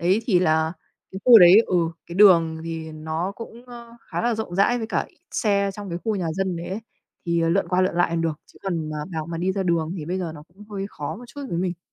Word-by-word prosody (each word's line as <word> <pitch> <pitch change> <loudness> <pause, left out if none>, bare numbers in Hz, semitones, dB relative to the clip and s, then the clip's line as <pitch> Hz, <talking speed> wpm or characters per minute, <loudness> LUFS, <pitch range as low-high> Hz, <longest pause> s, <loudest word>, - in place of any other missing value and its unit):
Đấy, 185 +6 +2
thì 185 -7 +3
là 160 -1 +2 0.4
cái 190 - -5
khu 240 -3 +10
đấy 180 +4 +9
ừ, 180 - +1 0.3
cái 170 - -8
đường 170 -5 +5
thì 160 -1 -5
nó 160 +5 -3
cũng, 235 +1 -10
ơ, 235 -1 -12
khá - - -5
là 240 -1 +1
rộng 215 -5 -5
rãi 240 +6 +3
với 225 - -4
cả - - -1
ít - - -30
xe 200 -3 +1
trong 205 -2 -7
cái 170 0 -4
khu 220 - 0
nhà 175 -3 -2
dân 190 -1 -2
đấy 170 - -6
ấy, 195 +4 -4 0.5
thì, 170 0 +1
ờ, 165 - +1
lượn 175 0 +1
qua 180 +1 +2
lượn 185 -2 +1
lại 175 0 +2
còn 170 0 -1
được, 160 -2 -2
chứ - - -20
còn 165 -5 -3
mà 155 - -4 0.2
bảo 160 -1 -3
mà 165 -1 -5
đi 185 +2 0
ra 195 -1 -1
đường 170 -2 0
thì 155 - -5
bây 185 +2 -2
giờ 170 -3 -4
nó 150 - -11
cũng 195 +5 -16
hơi 195 -1 -4
khó 150 0 -6
một 245 - -11
chút 265 +4 -10
với 170 - -2
mình. 180 -1 -2
180 Hz, 275 wpm, -23 LUFS, 165-200 Hz, 0.5 s, khu